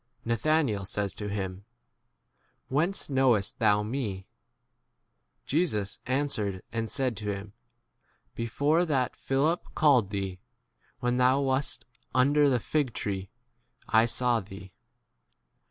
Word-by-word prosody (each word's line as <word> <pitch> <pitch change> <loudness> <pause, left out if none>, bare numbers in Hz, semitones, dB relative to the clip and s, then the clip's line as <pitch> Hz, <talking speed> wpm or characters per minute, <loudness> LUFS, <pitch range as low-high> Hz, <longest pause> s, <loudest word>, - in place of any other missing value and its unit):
Na 115 - +1
thanael 125 -5 +1
says 100 0 -2
to 105 -1 -5
him, 95 -1 -4 1.1
Whence 165 +9 0
knowest 130 -5 +2
thou 105 -2 +4
me? 105 -5 -3 1.2
Jesus 120 - 0
answer 130 -5 +1
ed 95 -2 -5
and 115 -1 -2
said 130 -4 0
to 105 - -6
him, 100 0 -7 0.8
Before 145 +8 +1
that 135 -7 0
Philip 145 +6 0
called 130 -10 +4
thee, 95 -3 -3 0.6
when 125 0 +1
thou 130 +2 +4
wast 135 0 -1 0.3
under 145 +3 +4
the 125 -2 +2
fig 140 0 -1
tree, 95 -2 -3 0.6
I 110 +1 +5
saw 120 0 +2
thee. 95 -2 -11
120 Hz, 120 wpm, -28 LUFS, 105-140 Hz, 1.2 s, I